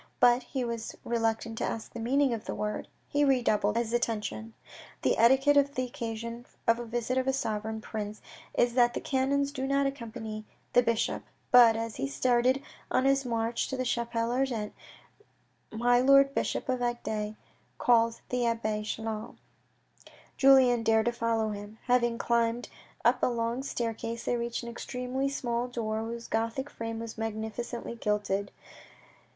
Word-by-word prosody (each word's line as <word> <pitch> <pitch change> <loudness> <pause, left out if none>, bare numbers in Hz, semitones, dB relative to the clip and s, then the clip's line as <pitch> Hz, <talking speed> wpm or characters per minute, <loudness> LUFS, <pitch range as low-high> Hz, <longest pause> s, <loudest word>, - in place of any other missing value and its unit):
But 245 +1 +6
he 260 +1 -3
was 230 -1 -4
reluctant 225 -1 -1
to - - -1
ask 225 - -4
the 235 - -6
meaning 265 +3 +2
of 225 -1 -5
this - - -4
word. 210 0 -3 0.2
He 290 +1 +1
redoubled 230 -6 +2
his 235 -1 -1
attention. 225 -1 -2 0.5
The - - +3
etiquette 265 +5 +5
on 285 0 +5
the 255 - 0
occasion 235 0 -6 0.2
of 230 0 +3
a 240 - -5
visit 240 +2 -1
of 260 - -2
a 265 - +3
sovereign 220 -3 -2
prince 210 -1 -5 0.4
is 240 0 +3
that 240 -1 +4
the - - -1
canons 280 +1 +1
do 265 -2 -3
not 275 0 +2
accompany 225 -5 -5 0.3
the 245 - +7
bishop. 230 -2 0 0.3
But, 240 -3 +8
as 225 -1 -4
he 135 - -1
started 250 - +2 0.3
on 255 - +2
his 275 0 +3
march 230 -1 -1
to 265 - -4
the 255 - 0
cliapelle 235 -1 -1
ardente, 245 -5 -1 1.0
my 245 +2 +3
lord 275 +1 +6
bishop - - -1
of 255 -1 0
Agde 220 -3 -2 0.4
called 230 -1 +3
the 250 -1 0
abbe 220 -2 -1
Chelan. 220 0 -4 1.0
Julien 265 -3 +6
dared 225 -1 +3
to 240 - +2
follow 230 -2 0
him. 205 +1 -7
Having 240 -1 +2
climbed 235 0 0 0.4
up 245 +1 +4
a - - +4
long 235 +1 -1
staircase, 230 -3 -3
they - - +1
reached 235 0 -3
an 235 - -5
extremely 250 +3 -3
small 245 -3 -2
door 220 -3 -2
whose 230 +1 -5
Gothic 230 +5 -2
frame 225 0 -5
was 225 -1 -7
magnificently 225 +2 -4
gilded. 205 -2 -1
235 Hz, 160 wpm, -29 LUFS, 225-250 Hz, 1.0 s, But